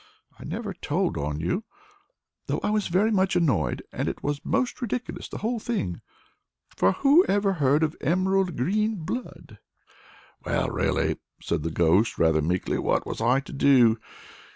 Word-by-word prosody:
I - - -9
never 215 -4 -4
told 175 +2 -1
on 75 +1 -3
you, 90 - -1 0.8
though - - -1
I 205 - +1
was 215 -1 0
very 195 +6 +2
much 190 -3 +2
annoyed, 130 - +1
and - - -3
it - - -7
was 145 0 -2
most 255 0 -1
ridiculous, 245 +1 -4
the - - -6
whole 230 +2 -2
thing; 205 - -3 0.7
for 95 - +3
who 285 +6 +5
ever 200 0 +1
heard 145 -2 +2
of 155 -1 0
emerald 185 +2 +1
green 210 - +1
blood?" 220 +8 -7 0.8
"Well, - - 0
really," - - 0 0.2
said 85 - -2
the 80 - -2
Ghost, 85 +7 +2
rather 80 -1 +3
meekly, 90 +4 -1
"what - - 0
was - - -5
I 125 +4 +3
to 140 - -11
do? 125 -5 +4
160 Hz, 160 wpm, -26 LUFS, -, 0.8 s, who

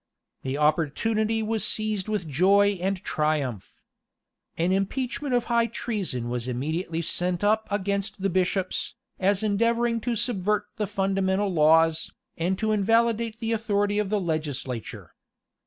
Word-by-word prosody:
The 135 +1 -3
opportunity 215 +9 +1
was 220 0 -1
seized 215 -3 0
with 210 -6 -2
joy 195 +6 +3
and 195 +1 0
triumph. 150 -9 -2 0.7
An 170 +2 +1
impeachment 250 +7 -1
of 245 - +2
high 235 -1 +2
treason 190 - -3
was 120 0 -3
immediately 160 +7 -2
sent 175 +2 0
up 220 +1 +2
against 200 0 -2
the 195 - +2
bishops, 185 +1 -1 0.2
as 200 +2 +1
endeavoring 230 +2 +1
to 235 +1 -1
subvert 210 -2 0
the 210 -2 -1
fundamental 195 0 0
laws, 160 0 +4 0.2
and 180 +3 -1
to 220 +1 0
invalidate 225 +2 +2
the 225 -1 -2
authority 205 -2 +1
of 210 -2 -1
the 210 0 +1
legislature. 145 - -4
195 Hz, 135 wpm, -26 LUFS, 165-220 Hz, 0.7 s, laws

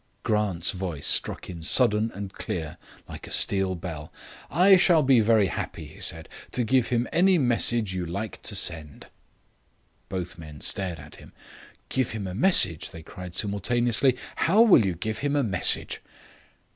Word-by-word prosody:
Grant's 105 -6 0
voice 90 -6 -5
struck - - +1
in 85 -2 -8
sudden 110 +4 +2
and 100 -1 -7
clear, 80 -4 -6 0.3
like - - -10
a - - -11
steel 95 -1 +1
bell: 80 -3 -8 0.4
"I 185 +6 +5
shall 175 -4 +4
be 130 -2 +4
very 110 -1 +3
happy," 95 - -5
he - - -14
said, - - 0 0.3
"to 125 - 0
give 125 +1 +1
him 120 0 -1
any 185 +1 +4
message 120 - +1
you 90 -1 -3
like 100 +5 -6
to - - -3
send." 75 -4 -3 1.0
Both 90 -2 -5
men 75 -2 -11
stared 95 -4 -4
at 75 0 -12
him. - - -16 0.6
"Give 130 -2 -1
him 105 -3 -5
a 90 - -5
message?" 95 - +3
they 80 - -11
cried 90 +2 -10
simultaneously. 120 +5 +1 0.2
"How 205 +7 +4
will 195 - +6
you 95 -3 -2
give 110 +5 -4
him 145 +2 -1
a 145 - +2
message?" 95 -7 +2
100 Hz, 165 wpm, -25 LUFS, 90-125 Hz, 1.0 s, will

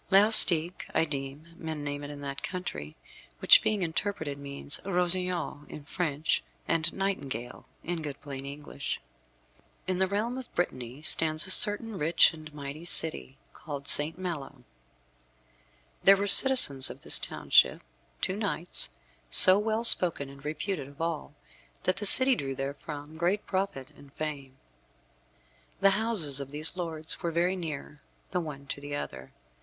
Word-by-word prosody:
Laustic, 190 -4 +5
I - - +2
deem, 140 +1 -7
men 160 -2 -7
name 145 0 -6
it 145 - -8
in 145 -1 -10
that 140 -1 -7
country, 180 - -7 0.4
which, - - +7
being 210 -3 -1
interpreted, 160 -4 -4
means 140 0 -6
rossignol 180 -4 -1
in 150 - -10
French, 155 -1 -2 0.3
and 165 0 0
nightingale 140 - -5 0.2
in 175 -1 -5
good 145 -2 -7
plain 135 -2 -9
English. 140 0 -7 0.9
In 185 0 -3
the 190 - +1
realm 220 +6 -3
of 260 - -12
Brittany 130 -5 -4
stands 155 0 +2
a 190 - -2
certain 210 -1 +2
rich 165 +3 +3
and 155 -1 -12
mighty 145 +1 -9
city, 160 -5 +2 0.2
called 140 -2 -9
Saint 155 +3 +2
Malo. 145 -8 -7 1.4
There 195 0 +6
were 200 - -2
citizens 200 - +7
of - - -11
this - - +8
township - - +1 0.4
two 190 - -1
knights, 195 -5 -1 0.4
so 185 - +8
well 220 +2 -2
spoken 175 -10 +4
and 140 0 -15
reputed 150 0 -5
of 140 0 -17
all, 165 -3 -5 0.5
that 185 - -1
the 205 - +1
city 260 +5 +6
drew 135 - -5
therefrom 145 +3 -8
great 180 +5 -1
profit 190 -9 -4
and 140 -1 -19
fame. 140 -4 -7 1.2
The 195 0 +4
houses 195 -10 0
of 140 -1 -7
these 150 +4 -1
lords 160 -3 -2
were 170 - -2
very 175 +3 -1
near 150 -4 -8 0.3
the 180 -2 -2
one 145 -4 -9
to 140 - -7
the 145 0 -7
other. 65 - -8
160 Hz, 150 wpm, -27 LUFS, 140-185 Hz, 1.4 s, this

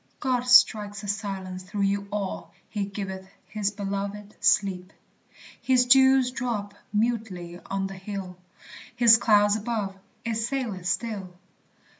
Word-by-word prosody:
God 250 -2 0
strikes 215 -5 +5
a - - -6
silence 195 -2 -4
through 200 +2 -3
you 200 0 0
all, 200 -2 -4 0.2
"He 205 -2 -3
giveth 190 -1 -6 0.2
his 210 -2 -1
beloved 200 0 -5
sleep." 185 -2 +2 0.7
His 255 -1 +3
dews 265 0 +5
drop 230 -6 -3 0.2
mutely 210 -6 -2
on 195 0 -2
the 195 - -5
hill, 190 -1 -7 0.6
His 235 -2 +7
cloud 205 -2 +4
above 215 -3 -3 0.3
it 230 -1 -1
saileth 225 -6 -3
still. 195 -2 -2
205 Hz, 125 wpm, -26 LUFS, 195-230 Hz, 0.7 s, His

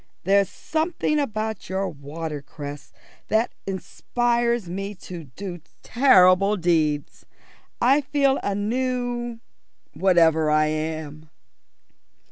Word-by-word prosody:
There's 195 0 +3
something 315 -1 -1
about 220 -5 -3
your 190 +1 -1
watercress 145 -2 -7 0.4
that 220 +2 +1 0.2
inspires 235 +3 -1
me 195 +3 -5
to 175 -3 -9
do 175 +6 -8 0.2
terrible 200 -5 +5
deeds. 160 -4 0 0.5
I 270 +5 +4
feel 275 -1 +1
a 200 - -1
new 240 +1 -2 0.5
whatever 165 -4 +3
I 155 0 +4
am." 155 0 -4
195 Hz, 95 wpm, -24 LUFS, 160-240 Hz, 0.5 s, terrible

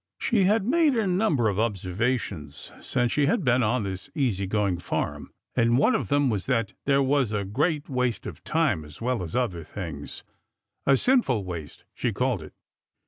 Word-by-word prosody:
She 210 -5 +2
had 205 +1 +3
made 305 +2 +3
a 225 -2 +1
number 180 - +2
of 100 -1 0
observations 105 - -2
since 120 -2 0
she 145 -1 +2
had 195 +4 +1
been 125 -2 +3
on 120 +1 +1
this 95 +4 -5
easy 110 - 0
going 100 -3 0
farm, 75 -4 -3 0.2
and 120 -1 +3
one 140 - +4
of 125 - 0
them 145 +3 +2
was 105 -6 -1
that 115 -6 0
there 140 -1 +4
was 135 -4 +2
a 105 -2 -1
great 145 - 0
waste 125 -5 -1
of - - -8
time 145 - +1
as 75 -1 -13
well 125 -1 -1
as 85 -2 -5
other 100 -10 -1
things 80 -5 -7 0.3
— - - -55
a 135 -1 +6
sinful 185 - +2
waste, 85 -5 -7
she 120 - -1
called 125 -2 0
it. 75 - -12
120 Hz, 190 wpm, -26 LUFS, 95-140 Hz, 0.3 s, a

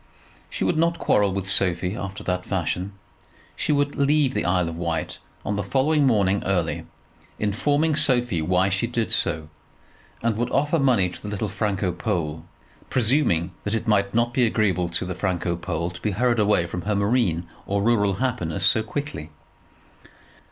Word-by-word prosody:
She - - -3
would 160 - +1
not 170 +1 +2
quarrel 100 -1 +2
with 95 0 -3
Sophie 90 -1 +1
after 95 -1 -6
that 90 0 -1
fashion. 95 +1 -2 0.6
She - - -1
would 145 0 +1
leave 140 -1 +2
the - - -1
Isle 90 -1 +2
of 85 - -5
Wight 85 -2 -3 0.3
on 105 - -1
the 100 - -1
following 140 +7 +2
morning 100 -5 +2
early, 90 -4 -1 0.5
informing 145 +9 +1
Sophie 120 - +3
why 90 +4 +2
she 95 +5 0
did 115 -2 -1
so, 80 -4 0 0.8
and 115 -2 +1
would 120 +1 -1
offer 150 +4 +1
money 125 -9 +3
to - - -11
the - - -7
little 105 0 -3
Franco 100 -2 -1
Pole, 80 -2 -3 0.5
presuming 115 - +2
that 105 +2 -1
it 115 +2 -3
might 100 -2 +2
not 120 +1 +2
be 125 - +2
agreeable 100 -6 +1
to 85 - -2
the 90 - -3
Franco 90 -2 -1
Pole 85 0 -3
to 85 0 -11
be 110 - 0
hurried 120 +4 +1
away 105 -4 +3
from 90 +1 -5
her 105 +4 -1
marine 100 -5 +1 0.2
or 100 0 0
rural 105 -3 +3
happiness 120 -9 -1
so 110 - +5
quickly. 110 - -5
100 Hz, 175 wpm, -24 LUFS, 90-120 Hz, 0.8 s, so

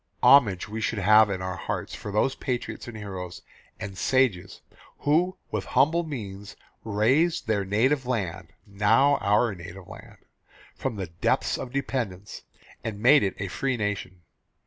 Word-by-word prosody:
Homage 120 -8 +5
we 110 +1 -5
should 110 - -1
have 105 +2 +6
in 95 -2 -3
our 95 0 -4
hearts - - -4
for 105 - -6
those 110 +6 +1
patriots 125 -4 -4
and 115 -2 -7
heroes 95 -4 -7 0.4
and 100 -3 -6
sages 100 -9 +1 0.4
who 175 +6 +2
with - - -2
humble 160 +5 +3
means 105 - -7 0.3
raised 125 +11 +2
their 105 -3 0
native 125 +7 +1
land 95 -8 -2 0.2
now 105 +8 +3
our 105 +2 +2
native 90 +1 -10
land - - -12 0.6
from 130 -4 -4
the 95 -2 -3
depths 85 +1 0
of 125 - -6
dependence, 115 -8 -4 0.4
and 105 -2 -5
made 135 +7 +6
it 100 -2 -1
a 100 - -4
free 130 +6 -2
nation. 100 -4 -4
105 Hz, 150 wpm, -26 LUFS, 95-130 Hz, 0.6 s, have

